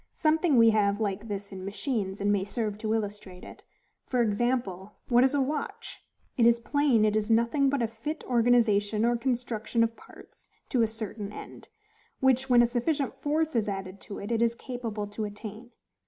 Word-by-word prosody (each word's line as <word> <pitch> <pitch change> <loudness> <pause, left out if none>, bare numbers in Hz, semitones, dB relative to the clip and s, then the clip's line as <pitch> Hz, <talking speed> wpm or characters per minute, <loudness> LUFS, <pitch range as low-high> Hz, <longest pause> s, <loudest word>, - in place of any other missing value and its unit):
Something 315 -2 +2
we 230 -1 +7
have 205 -1 +2
like 205 0 -2
this 200 -1 -5
in 190 -1 -7
machines, 200 0 -3
and 205 0 +1
may 200 -2 +1
serve 210 0 -3
to 220 0 0
illustrate 205 -4 -5
it. - - -11 0.5
For 250 -2 +2
example, 210 -3 -1 0.2
what 245 0 +5
is 265 +2 +2
a 280 - +2
watch? 300 - -4 0.4
It 235 -2 +5
is 235 0 +4
plain 260 -3 +2
it 215 0 +1
is 215 0 0
nothing 235 +5 +3
but 275 -3 0
a - - +1
fit 230 +8 -6
organization 225 -3 +3
or 240 0 +3
construction 235 -2 -1
of 230 0 -1
parts - - -17 0.2
to 250 - +2
a 225 - +4
certain 215 -2 -6
end, - - -10 0.5
which, 265 0 +2
when 240 -1 +6
a - - +5
sufficient 265 +4 -1
force 310 0 0
is 220 -2 +1
added 195 0 -6
to 200 - -8
it, 205 +3 -6
it 230 -1 +1
is 235 0 +2
capable 235 -5 -5
to 205 +2 -5
attain. 215 +2 -7
230 Hz, 190 wpm, -28 LUFS, 205-250 Hz, 0.5 s, we